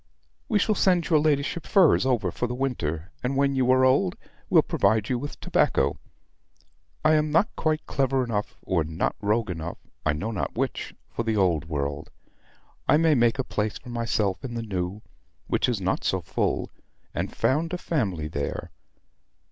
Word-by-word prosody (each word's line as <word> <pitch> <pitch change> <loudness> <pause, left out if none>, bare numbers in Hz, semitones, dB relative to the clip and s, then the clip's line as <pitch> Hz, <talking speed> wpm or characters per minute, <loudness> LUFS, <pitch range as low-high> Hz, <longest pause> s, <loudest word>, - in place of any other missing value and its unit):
We 215 -4 +3
will 215 - +3
send 180 -4 +2
your 155 - +6
ladyship 150 +2 0
furs 175 -9 +5
over 110 -9 +1
for 125 - -2
the 125 - -4
winter; 90 - -2
and, 130 +2 -1
when 140 0 +3
you 130 -2 +1
are 130 0 +5
old, 130 -8 +3 0.3
we'll - - +6
provide 105 +1 +1
you 125 - 0
with 145 +3 -7
tobacco. - - +1 1.1
I 155 - +6
am 155 0 +2
not 165 +9 +2
quite 155 -1 0
clever 135 -1 +1
enough, 105 -4 -3
or 90 -4 +1
not 80 +2 -2
rogue 105 0 +1
enough 85 0 -5 0.3
I 75 - +2
know 100 +10 -3
not 110 - -3
which - - -2
for - - -4
the 110 -2 0
Old 85 -6 +2
World. 75 0 -3 0.8
I - - +6
may 160 0 +4
make 120 -1 +3
a 135 - 0
place 105 -3 -2
for - - -13
myself 115 -5 -1
in 120 -3 -5
the 115 - -3
New, 95 -1 -3 0.4
which - - +1
is 120 -5 0
not 95 0 -1
so - - +1
full; - - -1 0.4
and - - -2
found 160 +5 +1
a 180 - -1
family 100 - -1
there. 70 -2 -4
120 Hz, 180 wpm, -26 LUFS, 95-140 Hz, 1.1 s, your